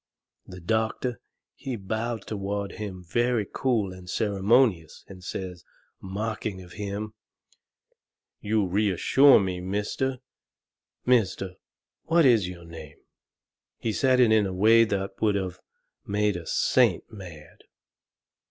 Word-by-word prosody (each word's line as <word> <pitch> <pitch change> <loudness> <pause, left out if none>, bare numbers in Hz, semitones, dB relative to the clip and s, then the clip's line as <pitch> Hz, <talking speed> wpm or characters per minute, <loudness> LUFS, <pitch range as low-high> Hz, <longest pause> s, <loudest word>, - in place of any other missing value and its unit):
The 90 - -10
doctor, 110 +5 -1 0.3
he 130 -2 -5
bowed 110 +2 -3
toward 100 -1 -3
him 100 -4 -7
very 120 +2 +1
cool 110 -5 -1
and 90 -1 -12
ceremonious, 100 -2 +1
and 90 -1 -12
says, 90 -2 -6 0.4
mocking 105 0 -4
of 90 - -15
him: 105 +2 -5 1.3
"You 105 -1 +1
reassure 105 +8 +5
me, 95 -2 -2
Mister 105 +8 -2 0.9
Mister 100 -6 +1 0.5
What 165 -1 +4
is 115 -8 +4
your 85 -2 -10
name?" 80 -3 -11 0.8
He 110 - -2
said 130 +1 +3
it 120 -3 +5
in 110 -2 +4
a 95 - -4
way 110 +5 +5
that 95 -2 -3
would 105 -2 +2
of 95 -2 -3 0.4
made 105 0 0
a 85 -2 -7
saint - - +2
mad. 85 -8 -12
100 Hz, 120 wpm, -26 LUFS, 95-110 Hz, 1.3 s, reassure